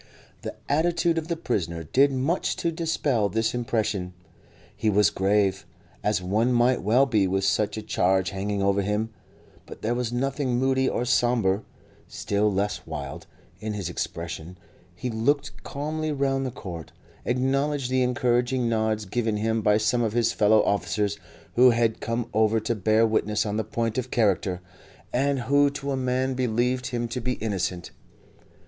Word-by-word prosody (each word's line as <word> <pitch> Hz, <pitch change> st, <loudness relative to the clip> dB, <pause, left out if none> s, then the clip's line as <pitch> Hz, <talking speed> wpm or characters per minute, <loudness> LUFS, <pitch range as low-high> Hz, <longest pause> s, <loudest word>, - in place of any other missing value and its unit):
The -, -, -6 dB
attitude 165 Hz, +2 st, +2 dB
of 160 Hz, -, -8 dB
the 170 Hz, -, -1 dB
prisoner 85 Hz, -, -2 dB
did 135 Hz, -, +3 dB
much 135 Hz, +7 st, 0 dB
to 170 Hz, -, -1 dB
dispel 150 Hz, -9 st, 0 dB
this 115 Hz, +3 st, 0 dB
impression; 110 Hz, -6 st, -2 dB, 0.6 s
he 110 Hz, -, 0 dB
was 105 Hz, -3 st, +4 dB
grave, 95 Hz, 0 st, +1 dB, 0.4 s
as 105 Hz, -3 st, +1 dB
one 110 Hz, +7 st, +1 dB
might 120 Hz, +1 st, +3 dB
well 120 Hz, +8 st, +4 dB
be 105 Hz, -7 st, +2 dB
with 95 Hz, +1 st, 0 dB
such 105 Hz, +2 st, +1 dB
a 110 Hz, -, -4 dB
charge 95 Hz, -2 st, +1 dB
hanging 100 Hz, 0 st, -2 dB
over 100 Hz, 0 st, +2 dB
him, 105 Hz, +3 st, -1 dB, 0.6 s
but -, -, -11 dB
there 115 Hz, +2 st, +1 dB
was 120 Hz, -1 st, -2 dB
nothing 130 Hz, 0 st, -1 dB
moody 130 Hz, +1 st, +2 dB
or 120 Hz, -, -1 dB
sombre, 120 Hz, -5 st, +2 dB, 0.5 s
still 105 Hz, +1 st, 0 dB
less 100 Hz, +1 st, -2 dB
wild, 70 Hz, -2 st, -6 dB, 0.3 s
in 110 Hz, 0 st, -4 dB
his 100 Hz, -4 st, -3 dB
expression; 85 Hz, 0 st, -5 dB, 0.4 s
he 125 Hz, +7 st, -4 dB
looked 140 Hz, +6 st, 0 dB
calmly 155 Hz, +2 st, -3 dB
round 135 Hz, -2 st, 0 dB
the -, -, -2 dB
court, 85 Hz, -, -8 dB, 0.3 s
acknowledged 135 Hz, +2 st, 0 dB
the 130 Hz, 0 st, +2 dB
encouraging 125 Hz, 0 st, +1 dB
nods 110 Hz, -1 st, 0 dB
given 110 Hz, +1 st, -1 dB
him 110 Hz, +1 st, 0 dB
by 105 Hz, 0 st, +4 dB
some 120 Hz, +3 st, +1 dB
of 110 Hz, -2 st, 0 dB
his 115 Hz, -1 st, +2 dB
fellow 105 Hz, 0 st, +4 dB
officers, 100 Hz, +2 st, 0 dB, 0.3 s
who 125 Hz, +1 st, +7 dB
had 115 Hz, -2 st, +1 dB
come 115 Hz, +1 st, -2 dB
over 110 Hz, +1 st, +3 dB
to 110 Hz, +2 st, -1 dB
bear 110 Hz, +2 st, +3 dB
witness 105 Hz, -1 st, +1 dB
on 105 Hz, -1 st, -2 dB
the 110 Hz, -, 0 dB
point 115 Hz, +2 st, -2 dB
of 130 Hz, 0 st, -4 dB
character, 95 Hz, -5 st, +1 dB, 0.5 s
and 135 Hz, +1 st, +1 dB
who 140 Hz, +3 st, +3 dB
to 140 Hz, 0 st, -4 dB
a -, -, 0 dB
man 130 Hz, 0 st, 0 dB
believed 125 Hz, +1 st, 0 dB
him 120 Hz, -3 st, -2 dB
to 120 Hz, +2 st, -4 dB
be 125 Hz, +2 st, -1 dB
innocent. 95 Hz, -6 st, -3 dB
115 Hz, 165 wpm, -25 LUFS, 105-130 Hz, 0.6 s, who